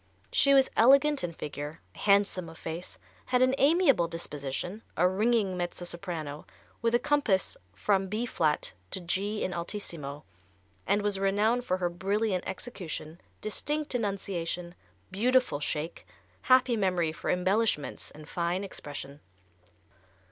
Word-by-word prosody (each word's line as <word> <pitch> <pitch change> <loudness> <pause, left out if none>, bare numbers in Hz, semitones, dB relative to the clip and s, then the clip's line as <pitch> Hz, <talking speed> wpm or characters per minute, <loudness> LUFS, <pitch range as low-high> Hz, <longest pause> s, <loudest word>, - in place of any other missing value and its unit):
She 275 0 +5
was 270 -1 +6
elegant 275 +4 +5
in 175 - -1
figure, 150 0 -6
handsome 200 -4 +2
of 165 - -12
face, 165 +3 -6 0.3
had 250 0 +3
an 255 0 +4
amiable 280 - +4
disposition, 165 +4 -4 0.2
a 180 +3 +5
ringing 205 0 +2
mezzo 175 0 -3
soprano, 170 -5 -5 0.3
with 230 +1 +2
a - - +7
compass 280 -11 +1 0.2
from 195 - +1
B 215 +5 -1
flat 155 - 0 0.2
to - - -1
G 195 +4 -1
in 185 - -2
altissimo, 170 -5 -5 0.6
and 205 0 +2
was 205 -2 0
renowned 210 +5 +2
for 185 - +1
her 180 -1 0
brilliant 195 +1 0
execution, 180 -5 -6 0.2
distinct 295 +8 -2
enunciation, 185 -6 -2 0.4
beautiful 250 - +2
shake, 150 +2 -3 0.3
happy 255 -1 +4
memory 180 -6 +1
for - - -5
embellishments 185 -2 +1
and 150 0 -12
fine 175 +2 -1
expression. 145 -6 -7
190 Hz, 130 wpm, -29 LUFS, 170-225 Hz, 0.6 s, a